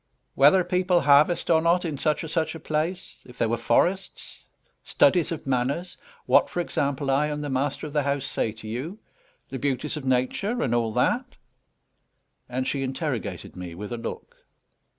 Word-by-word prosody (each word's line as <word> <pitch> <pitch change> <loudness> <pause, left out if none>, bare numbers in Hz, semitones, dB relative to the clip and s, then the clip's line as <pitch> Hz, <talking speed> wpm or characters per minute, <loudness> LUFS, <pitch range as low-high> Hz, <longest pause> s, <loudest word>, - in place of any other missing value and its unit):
"Whether 150 +7 +5
people 180 0 +2
harvest 150 +5 +4
or 160 -1 +5
not 170 +2 +2
in 155 -3 -2
such 155 +1 0
or - - -5
such 160 0 -1
a - - -7
place; 160 +5 -3
if 125 0 -15
there 115 - +1
were 115 - +1
forests; 180 +12 -1 0.4
studies 185 - +3
of 165 - -5
manners; 135 +7 -1 0.3
what, - - +4
for - - -4
example, 140 -4 -1
I 145 +3 +2
and 150 0 -3
the 145 - -4
master 135 +4 -1
of 150 - -7
the 150 - +2
house 140 -1 -1
say 115 - -1
to 110 0 -11
you; 135 - -5 0.5
the 135 - -5
beauties 140 +3 -2
of 150 - -6
Nature, 130 - 0
and 120 - 0
all 115 -2 +1
that." - - 0 1.1
And 130 +1 -2
she 140 - -1
interrogated 130 - -4
me 90 -2 -7
with 105 +5 -7
a - - -3
look. 115 - -7
145 Hz, 180 wpm, -25 LUFS, 125-165 Hz, 1.1 s, Whether